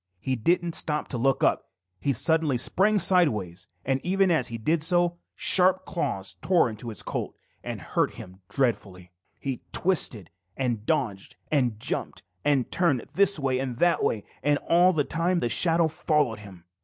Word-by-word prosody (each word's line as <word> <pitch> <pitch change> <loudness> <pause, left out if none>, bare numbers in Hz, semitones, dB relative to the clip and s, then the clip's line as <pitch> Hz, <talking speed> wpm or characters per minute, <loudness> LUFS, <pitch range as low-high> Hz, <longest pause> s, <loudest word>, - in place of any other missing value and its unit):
He 130 +7 -2
didn't 170 +8 0
stop 150 -1 -1
to 125 - -3
look 135 +2 +1
up. - - +1 0.3
He 140 - 0
suddenly 155 +1 +2
sprang 205 - +2
sideways, 110 - +2 0.2
and 135 0 0
even 190 +1 +1
as 150 -8 +2
he 115 - -6
did 155 +9 0
so, 175 +1 +2 0.2
sharp 185 0 +5
claws 120 - -3
tore 175 -10 +2
his 110 -3 -6
coat - - -5 0.3
and - - -5
hurt - - -2
him 95 +1 -12
dreadfully. 100 -8 -2 0.3
He 135 -3 -5
twisted 140 - 0 0.3
and 120 -5 -2
dodged 120 -11 -2 0.2
and 125 -8 0
jumped - - -4 0.2
and 140 -4 +1
turned 165 -9 +1
this 200 -1 +3
way 135 -3 -1
and 130 -2 -4
that 175 +7 +1
way, 105 -3 -1 0.2
and 145 +2 +2
all 175 +2 +5
the 155 -5 0
time 170 +5 -1
the 120 - -1
shadow 165 +4 +3
followed 150 -7 -1
him. 95 -4 -14
140 Hz, 165 wpm, -25 LUFS, 115-170 Hz, 0.3 s, sharp